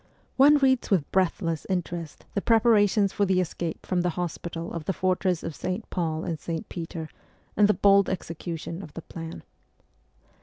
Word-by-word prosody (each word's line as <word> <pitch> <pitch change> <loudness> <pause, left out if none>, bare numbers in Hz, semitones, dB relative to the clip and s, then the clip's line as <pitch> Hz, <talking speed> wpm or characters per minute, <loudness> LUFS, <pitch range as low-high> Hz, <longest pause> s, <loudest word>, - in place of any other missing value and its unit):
One 290 +3 +7
reads 265 -3 +2
with 180 -9 +1
breathless 170 -3 0
interest 175 -3 -3
the 200 - 0
preparations 210 -3 +4
for 205 - +1
the 190 -2 +3
escape 170 -2 -3
from 180 -1 +1
the 180 - +1
hospital 170 -1 -4
of 170 -3 -5
the 195 - 0
fortress 185 -2 0
of 165 - -4
St. 185 +4 -4
Paul 160 -3 -1
and 165 -3 -3
St. 165 0 -4
Peter, 165 -2 -5 0.5
and 210 - +5
the 210 - +3
bold 200 -1 +5
execution 165 -1 -5
of 150 -6 -11
the 165 - -6
plan. 165 -1 -8
180 Hz, 165 wpm, -26 LUFS, 165-200 Hz, 0.5 s, One